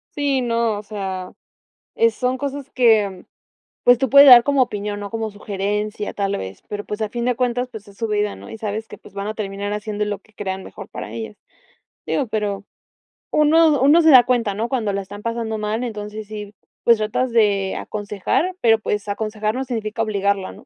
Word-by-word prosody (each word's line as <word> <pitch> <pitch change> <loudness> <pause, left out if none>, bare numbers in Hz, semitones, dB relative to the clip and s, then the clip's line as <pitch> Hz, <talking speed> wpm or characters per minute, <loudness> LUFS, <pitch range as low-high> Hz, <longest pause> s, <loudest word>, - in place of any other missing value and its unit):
Sí, 280 -2 +1
no, 230 -3 0
o 205 - -7
sea, 190 -3 -5 0.6
eh, 460 0 +4
son 255 - -2
cosas 280 -1 -5
que, 215 -6 +3 0.6
pues, 245 0 +7
tú 265 +1 0
puedes 280 +2 +9
dar 245 -3 +10
como 280 -2 +2
opinión, 205 -3 -4
¿no? 205 - -6
Como 220 0 -3
sugerencia 205 +1 -3
tal 200 -1 -1
vez, 95 0 -7
pero, 205 0 -5
pues, 210 +1 -6
a 215 - +1
fin 235 +3 -4
de 250 0 +1
cuentas, 250 0 0
pues, 220 -3 -10
es 200 - -15
su 225 -1 -2
vida, 210 -1 0
¿no? - - -12
Y - - -8
sabes 215 0 -4
que, - - -10
pues, - - -17
van 200 +1 -4
a 215 - -3
terminar 200 -1 -4
haciendo 210 0 -3
lo 205 -1 -3
que 215 +2 -28
crean 190 -2 -4
mejor - - -10
para - - -7
ellas. 220 -2 -6 0.7
Digo, 280 - 0
pero 205 -3 -2 0.7
uno 305 -2 +4
uno 295 +5 +6
se 320 - +5
da 255 -4 +8
cuenta, 240 -5 +1
¿no? 225 +3 -1
Cuando 235 -5 -1
la 200 - -2
están 205 +2 -10
pasando 230 -1 -3
mal, 215 +3 -2
entonces, 210 -1 -6
sí, 210 -1 -7 0.3
pues 235 -1 +5
tratas 225 +4 -1
de 200 -4 +2
aconsejar 210 - -2
pero 225 -1 +4
pues 210 -1 -2
aconsejar 215 +1 -2
no 260 - -2
significa 225 -3 -3
obligarla, 200 -3 0
¿no? - - -15
215 Hz, 205 wpm, -21 LUFS, 205-245 Hz, 0.7 s, dar